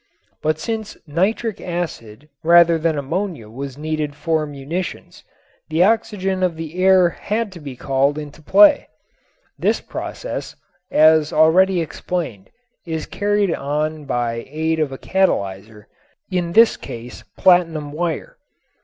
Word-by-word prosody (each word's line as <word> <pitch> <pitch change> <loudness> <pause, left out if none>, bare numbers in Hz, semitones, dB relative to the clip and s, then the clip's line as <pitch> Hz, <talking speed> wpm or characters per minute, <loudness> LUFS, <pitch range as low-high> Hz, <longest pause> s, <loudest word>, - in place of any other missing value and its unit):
But 155 0 0
since 220 +4 -4
nitric 195 +7 -1
acid 150 -8 -5
rather 170 0 +5
than 160 -1 0
ammonia 145 - -3
was 135 +2 -7
needed 155 -1 -3
for 160 -1 -1
munitions, 150 +6 -6 0.5
the 160 +2 +3
oxygen 200 -3 +1
of 180 -3 +1
the 165 +3 -4
air 185 -2 +6
had 210 +4 -3
to 180 - -10
be 140 -4 -8
called 135 +3 0
into 150 0 -8
play. 300 - +5 0.7
This - - +1
process, - - -6 0.3
as 155 -1 +5
already 175 +4 +4
explained, 160 - -4 0.3
is 160 -3 -4
carried 205 -3 0
on 150 +2 -2
by 120 -3 -2
aid 160 +2 -1
of 150 -3 0
a 135 - -6
catalyzer, 105 - -1 0.4
in 175 -2 -1
this 230 +3 +6
case 120 +1 -9
platinum 165 -5 +3
wire. 165 +1 -3
160 Hz, 125 wpm, -20 LUFS, 145-185 Hz, 0.7 s, air